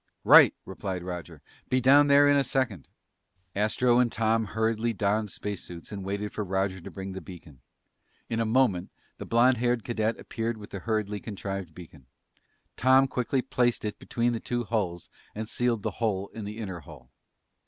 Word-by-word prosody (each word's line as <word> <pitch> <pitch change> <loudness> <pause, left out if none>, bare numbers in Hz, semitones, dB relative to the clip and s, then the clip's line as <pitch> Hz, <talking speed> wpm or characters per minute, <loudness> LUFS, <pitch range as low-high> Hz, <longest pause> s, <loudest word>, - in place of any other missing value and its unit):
"Right!" - - +8
replied 95 -3 -5
Roger. 90 -1 -7 0.3
"Be 130 - +2
down 140 +3 +6
there 140 0 +6
in 145 - +5
a 140 - +4
second." 125 - -2 0.7
Astro 120 +4 +3
and 120 -2 +3
Tom 115 0 +1
hurriedly 110 +2 0
donned 105 +1 0
space 105 0 -5
suits 85 +1 -10
and 100 -2 -5
waited 100 +2 -3
for 105 - -2
Roger 95 -1 -1
to - - -9
bring 95 -1 -7
the 95 - -6
beacon. 80 -6 -13 0.7
In 115 - -2
a - - +2
moment 110 -6 +2 0.3
the - - -7
blond 120 +2 +4
haired 120 -1 0
cadet 115 -1 -1
appeared 115 0 -3
with 105 -1 -11
the 100 - -5
hurriedly 105 0 -2
contrived 95 -5 -6
beacon. 80 -7 -13 0.7
Tom 130 +2 +5
quickly 130 0 -1
placed 120 -3 0
it 105 - -4
between 120 0 -1
the 115 - -2
two 120 +1 -2
hulls 90 -7 -2 0.3
and 110 +1 -4
sealed 120 -2 0
the - - -1
hole 100 -3 0
in 110 -2 -8
the 105 +1 -6
inner 95 -6 -5
hull. 70 -3 -14
110 Hz, 180 wpm, -27 LUFS, 95-120 Hz, 0.7 s, Right